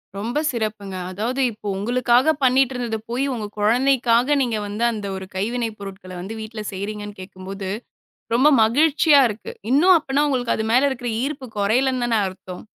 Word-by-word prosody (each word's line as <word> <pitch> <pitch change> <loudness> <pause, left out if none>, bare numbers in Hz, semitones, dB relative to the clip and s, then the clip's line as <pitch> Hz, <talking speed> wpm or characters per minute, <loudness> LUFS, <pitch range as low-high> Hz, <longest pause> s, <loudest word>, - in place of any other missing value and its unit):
ரொம்ப 235 +9 -2
சிறப்புங்க. 215 -5 -4 0.2
அதாவது 235 +8 -2
இப்போ 210 -1 -10
உங்களுக்காகப் 250 +7 +2
பண்ணிட்டு 260 0 +3
இருந்தது 235 -3 -2
போய் 250 +4 -1
உங்க 225 -4 -4
குழந்தைக்காக 245 +3 +3
நீங்க 235 -4 0
வந்து 210 +3 -3
அந்த 210 -3 -5
ஒரு 190 0 -6
கைவினை 230 +4 -1
பொருட்கள 195 -2 -9
வந்து 195 +5 -6
வீட்ல 220 0 -7
செய்றீங்கன்னு 205 +1 -6
கேட்கும்போது, 190 +1 -7 0.7
ரொம்ப 265 +5 +5 0.2
மகிழ்ச்சியா 295 +5 +4
இருக்கு. 210 +1 -7 0.2
இன்னும் 350 +7 +6
அப்பனா 285 -1 0
உங்களுக்கு 245 -3 0
அது 220 - -2
மேல 260 +4 +4
இருக்குற 245 -2 -4
ஈர்ப்பு 275 -2 -4
குறையலைன்னுதானே 240 +2 +1
அர்த்தம். 185 -1 -9
235 Hz, 150 wpm, -22 LUFS, 205-260 Hz, 0.7 s, இன்னும்